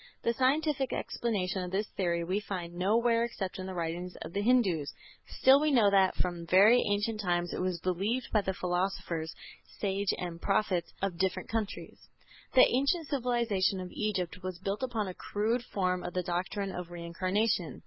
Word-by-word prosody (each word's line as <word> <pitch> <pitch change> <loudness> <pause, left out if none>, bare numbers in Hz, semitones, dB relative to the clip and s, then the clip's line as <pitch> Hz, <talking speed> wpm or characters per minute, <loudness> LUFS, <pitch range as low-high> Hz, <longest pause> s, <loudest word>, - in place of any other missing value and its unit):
The 235 - +2
scientific 270 +2 +1
explanation 195 -5 -2
of 180 - -4
this 195 +3 -1
theory 170 -3 0
we 185 +4 0
find 180 -5 -5
nowhere 230 +6 +2
except 195 -6 -4
in 185 - -5
the 190 - -6
writings 175 +1 -3
of 170 - -8
the 200 - 0
Hindus; 205 - +2 0.4
still 265 +2 +5
we 305 +1 +2
know 230 -8 +5
that 190 -1 +4
from 175 -2 -2
very 205 +8 +6
ancient 210 +2 0
times 175 -2 0
it - - -3
was 185 -2 -1
believed 200 +8 -1
by 215 - +4
the 190 -1 -2
philosophers, 175 -3 -2 0.5
sages 200 0 0
and 170 -2 -5
prophets 195 -4 0
of 185 -3 -2
different 190 -1 -1
countries. 220 -3 -4 0.6
The 255 - +9
ancient 280 +5 +1
civilization 235 -8 +1
of 185 -1 -6
Egypt 190 -3 -2
was 185 -1 -5
built 195 +4 -3
upon 230 -5 -1
a 185 - -5
crude 220 +6 -1
form 180 -4 -1
of 175 - -6
the 180 - 0
doctrine 185 +3 -2
of 180 -2 -6
Reincarnation. 175 +2 -1
195 Hz, 175 wpm, -30 LUFS, 180-225 Hz, 0.6 s, The